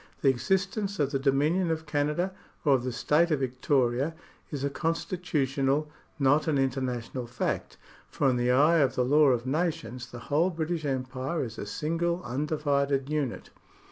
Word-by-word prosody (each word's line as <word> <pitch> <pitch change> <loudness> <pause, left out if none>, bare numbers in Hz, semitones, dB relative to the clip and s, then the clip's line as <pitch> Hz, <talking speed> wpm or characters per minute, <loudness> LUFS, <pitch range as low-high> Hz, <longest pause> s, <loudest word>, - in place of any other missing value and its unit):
The 140 - +5
existence 195 - 0
of 140 -2 +1
the 135 - 0
Dominion 150 +6 +2
of 160 0 -2
Canada 150 +5 0 0.3
or 145 - +5
of 130 -2 +2
the 130 - -2
State 150 +7 +2
of 155 -4 +1
Victoria 130 +2 0 0.3
is 140 -3 -4
a 140 - +1
constitutional, 150 -4 -1 0.3
not 145 +3 +3
an 150 -3 +2
international 130 -2 -2
fact, 120 - -3 0.3
for 140 - 0
in 130 - +3
the. 120 0 +1
eye 150 +6 +5
of 135 -3 +2
the 125 - +2
law 150 +3 +5
of 125 -2 +2
nations 130 -5 -2
the 120 - -9 0.2
whole 165 +5 +4
British 165 -1 -3
Empire 130 +3 -2
is 115 -3 -7
a 105 - -5
single 165 - -1
undivided 140 0 0
unit. 145 -5 -2
140 Hz, 165 wpm, -28 LUFS, 130-160 Hz, 0.3 s, The